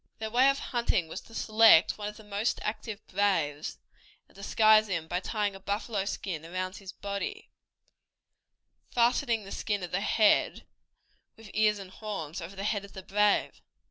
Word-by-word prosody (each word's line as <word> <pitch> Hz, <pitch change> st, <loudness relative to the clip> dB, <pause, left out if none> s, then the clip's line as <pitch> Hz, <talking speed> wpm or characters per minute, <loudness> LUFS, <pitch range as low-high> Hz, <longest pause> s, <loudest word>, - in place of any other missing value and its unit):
Their 220 Hz, 0 st, -5 dB
way 255 Hz, +4 st, +5 dB
of 275 Hz, -, +1 dB
hunting 235 Hz, -11 st, 0 dB
was -, -, -6 dB
to 225 Hz, -, -15 dB
select 215 Hz, -6 st, +5 dB
one 205 Hz, -, -3 dB
of 210 Hz, -, -7 dB
the 220 Hz, -, -13 dB
most 210 Hz, +2 st, -1 dB
active 215 Hz, 0 st, -5 dB
braves, 170 Hz, -7 st, 0 dB, 0.5 s
and -, -, -26 dB
disguise 215 Hz, +2 st, +4 dB
him 170 Hz, -5 st, -3 dB
by 175 Hz, +2 st, -1 dB
tying 205 Hz, +1 st, -2 dB
a 195 Hz, -, -10 dB
buffalo 205 Hz, +1 st, -2 dB
skin 180 Hz, -5 st, -4 dB
around 185 Hz, +3 st, -4 dB
his 195 Hz, -2 st, -9 dB
body, 200 Hz, -, -5 dB, 1.4 s
fastening 235 Hz, -1 st, +2 dB
the 195 Hz, -, -10 dB
skin 205 Hz, -3 st, -2 dB
of 175 Hz, -, -6 dB
the 195 Hz, -, 0 dB
head, 215 Hz, 0 st, +2 dB, 0.7 s
with 220 Hz, -3 st, -13 dB
ears 210 Hz, 0 st, +3 dB
and 195 Hz, -2 st, -9 dB
horns, 190 Hz, -6 st, -6 dB
over 170 Hz, +4 st, -8 dB
the 195 Hz, -, -5 dB
head 205 Hz, -1 st, -1 dB
of 200 Hz, -, -13 dB
the 190 Hz, -, -8 dB
brave. 210 Hz, +2 st, +1 dB
205 Hz, 175 wpm, -29 LUFS, 190-220 Hz, 1.4 s, way